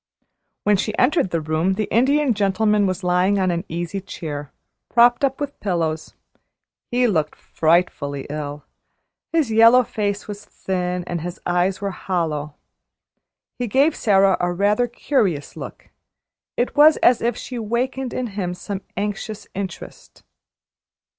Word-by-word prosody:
When 205 Hz, -1 st, +3 dB
she 215 Hz, +2 st, -2 dB
entered 260 Hz, -, +3 dB
the 165 Hz, -2 st, -1 dB
room 155 Hz, +4 st, 0 dB
the 215 Hz, -, -1 dB
Indian 270 Hz, +3 st, +3 dB
Gentleman 210 Hz, 0 st, +2 dB
was 185 Hz, +1 st, -3 dB
lying 180 Hz, +3 st, +2 dB
on 185 Hz, -2 st, +1 dB
an 170 Hz, 0 st, -2 dB
easy 175 Hz, +4 st, -4 dB
chair, 145 Hz, -6 st, -6 dB, 0.4 s
propped 240 Hz, +2 st, +4 dB
up 270 Hz, -1 st, +1 dB
with 285 Hz, -1 st, -5 dB
pillows. 165 Hz, -5 st, -2 dB, 0.7 s
He 245 Hz, 0 st, +2 dB
looked 160 Hz, -9 st, 0 dB
frightfully 155 Hz, -4 st, 0 dB
ill. 145 Hz, 0 st, -5 dB, 0.7 s
His 320 Hz, -8 st, +1 dB
yellow 230 Hz, +3 st, +7 dB
face 205 Hz, -2 st, -3 dB
was 205 Hz, 0 st, -7 dB
thin, 180 Hz, -1 st, -3 dB
and 175 Hz, -1 st, -4 dB
his 175 Hz, +1 st, -6 dB
eyes 180 Hz, +2 st, +1 dB
were 200 Hz, -1 st, -2 dB
hollow. 155 Hz, -6 st, -3 dB, 1.0 s
He 245 Hz, -, -1 dB
gave 275 Hz, +8 st, +3 dB
Sara 195 Hz, -3 st, +3 dB
a 175 Hz, 0 st, 0 dB
rather 205 Hz, +6 st, +2 dB
curious 205 Hz, -, -1 dB
look -, -, -9 dB, 0.7 s
it 245 Hz, -, -1 dB
was 305 Hz, +1 st, +7 dB
as 245 Hz, -, +5 dB
if 235 Hz, -1 st, 0 dB
she 250 Hz, -2 st, -6 dB
wakened 245 Hz, +3 st, -2 dB
in 255 Hz, -, -2 dB
him 180 Hz, -3 st, -3 dB
some 195 Hz, +1 st, -5 dB, 0.2 s
anxious 205 Hz, +1 st, -4 dB
interest. 190 Hz, -2 st, -8 dB
195 Hz, 140 wpm, -21 LUFS, 175-235 Hz, 1.0 s, yellow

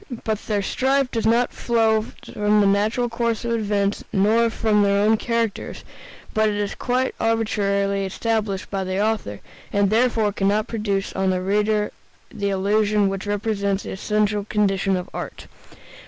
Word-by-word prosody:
But 220 Hz, -2 st, -1 dB
their 205 Hz, -2 st, 0 dB
strife 265 Hz, +4 st, +1 dB
does 225 Hz, -1 st, 0 dB
not 235 Hz, +2 st, +2 dB
flow 225 Hz, -2 st, +2 dB, 0.2 s
from 210 Hz, 0 st, +1 dB
the 205 Hz, -, +4 dB
natural 210 Hz, +5 st, +2 dB
course 235 Hz, -1 st, -2 dB
of 235 Hz, -, -1 dB
events 205 Hz, -3 st, 0 dB
nor 220 Hz, +4 st, +3 dB
from 220 Hz, -2 st, +1 dB
their 200 Hz, 0 st, +3 dB
own 215 Hz, +2 st, +4 dB
characters, 230 Hz, -1 st, -2 dB, 0.5 s
but 215 Hz, 0 st, +3 dB
is 205 Hz, -1 st, -2 dB
quite 255 Hz, +1 st, -1 dB
arbitrarily 200 Hz, -3 st, 0 dB
established 205 Hz, 0 st, -2 dB
by 195 Hz, -1 st, -1 dB
the 185 Hz, +1 st, -2 dB
author, 210 Hz, -, -1 dB, 0.3 s
and 200 Hz, -1 st, +2 dB
therefore 225 Hz, -2 st, +2 dB
can 195 Hz, -1 st, 0 dB
not 210 Hz, +3 st, +1 dB
produce 205 Hz, -4 st, -2 dB
on 190 Hz, 0 st, 0 dB
the 185 Hz, -1 st, +1 dB
reader 210 Hz, +2 st, +1 dB, 0.4 s
the 200 Hz, -1 st, -2 dB
illusion 205 Hz, +1 st, +2 dB
which 195 Hz, +1 st, -5 dB
represents 205 Hz, -1 st, -1 dB
the -, -, -6 dB
essential 210 Hz, +1 st, 0 dB
condition 195 Hz, -2 st, +1 dB
of 180 Hz, 0 st, -5 dB
art. -, -, -6 dB
210 Hz, 155 wpm, -22 LUFS, 200-225 Hz, 0.5 s, the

